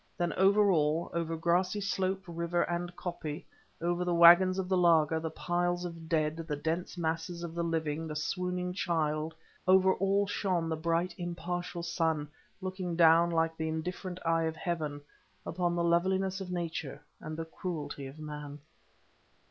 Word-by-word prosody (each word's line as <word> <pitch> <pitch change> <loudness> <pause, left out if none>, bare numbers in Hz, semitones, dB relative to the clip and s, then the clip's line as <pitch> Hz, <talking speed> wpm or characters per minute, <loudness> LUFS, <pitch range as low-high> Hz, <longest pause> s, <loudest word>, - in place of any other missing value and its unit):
Then 175 -1 0
over 200 +1 +4
all, 155 0 +1
over 165 -1 -2
grassy 180 +4 +1
slope, 190 -1 -1
river, 170 0 -1
and 175 0 -3
koppie, 165 -4 -5 0.3
over 175 +1 0
the 175 -1 0
waggons 175 +2 +8
of 190 -1 -1
the 190 - +2
laager, 165 -3 +4
the 160 0 -3
piles 175 +2 -1
of 165 -2 -8
dead, 155 -1 +1
the 165 -2 -3
dense 165 +5 -3
masses 165 +1 -2
of 170 -1 -5
the 170 - -2
living, 160 -1 -1
the 155 - -5
swooning 180 +3 -2
child, 160 -3 -1 0.3
over 190 0 +6
all 195 +1 +2
shone 185 -4 -1
the 160 - 0
bright 170 +2 0
impartial 175 0 -4
sun, 160 -3 0 0.3
looking 185 -2 -3
down 165 0 +6
like 165 -1 +1
the 160 0 -2
indifferent 180 +3 -4
eye 165 0 +2
of 160 0 -2
Heaven 155 -3 -3 0.4
upon 175 0 -1
the 170 - 0
loveliness 190 +3 +1
of 185 - -6
nature 165 -5 -4 0.2
and 155 0 -6
the 165 - -3
cruelty 150 -5 -5
of 135 +3 -11
man. 150 -1 -7
170 Hz, 165 wpm, -31 LUFS, 160-180 Hz, 0.4 s, waggons